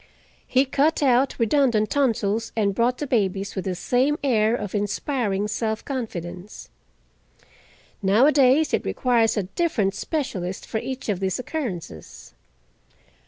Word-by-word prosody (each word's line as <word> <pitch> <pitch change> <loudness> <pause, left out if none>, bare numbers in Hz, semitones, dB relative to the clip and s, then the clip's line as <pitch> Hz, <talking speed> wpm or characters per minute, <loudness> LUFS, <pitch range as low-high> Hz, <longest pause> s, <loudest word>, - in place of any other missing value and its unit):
He 260 +1 +3
cut 290 +3 +1
out 260 0 +3
redundant 230 -3 +2
tonsils 225 -5 0
and 200 -2 +2
brought 240 +4 +1
the 295 - -3
babies 200 -6 -1
with 190 - -4
the 185 -1 -2
same 255 +10 +1
air 225 -4 +2
of 205 -5 -5
inspiring 205 0 -1
self 220 +1 -2
confidence. 185 - -6 1.3
Nowadays 265 +8 +4
it - - +1
requires 235 -3 +1
a 205 - +1
different 210 - 0
specialist 195 - -4
for 220 - -3
each 260 +3 -6
of 200 -4 -1
these 190 -1 -1
occurrences. 220 - -6
225 Hz, 125 wpm, -23 LUFS, 200-265 Hz, 1.3 s, Nowadays